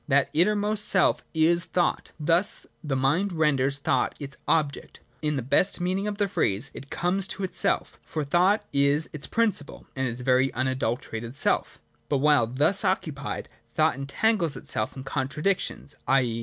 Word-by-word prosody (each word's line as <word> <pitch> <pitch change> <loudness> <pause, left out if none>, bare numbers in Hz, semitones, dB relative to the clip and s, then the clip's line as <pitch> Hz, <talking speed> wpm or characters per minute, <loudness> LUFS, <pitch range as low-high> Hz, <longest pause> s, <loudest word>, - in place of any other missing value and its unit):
That 140 -1 +2
innermost 210 +5 +2
self 190 - +3
is 170 +2 +4
thought. 175 -1 -1
Thus 165 +5 +2 0.2
tiie 140 -4 -1
mind 160 +10 +1
renders 140 -4 +1
thought 140 - 0
its 140 -1 -7
object. 150 -3 -1 0.2
In 150 -1 0
the 135 - -2
best 140 +11 +2
meaning 185 +3 -1
of 205 -1 -3
the 205 -1 +1
phrase, 140 - 0
it 140 - -10
comes 185 +2 0
to 195 - -4
itself; 185 - -1
for 155 - -4
thought 180 +8 +2
is 140 +2 +2
its 150 - -6
prin 230 -1 +2
ciple, 145 -6 -7
and 130 0 -1
its 120 +1 -5
very 130 +1 +3
unadulterated 120 -2 -2
self - - 0 0.3
But 145 - +2
while 145 -4 +4
thus 145 - +2
occupied, 150 -7 -2 0.3
thought - - +3
entangles 160 - 0
itself 110 +5 -2
in 130 - -6
contradictions, 145 +3 -2
i. 135 -1 +4
150 Hz, 160 wpm, -26 LUFS, 135-180 Hz, 0.3 s, is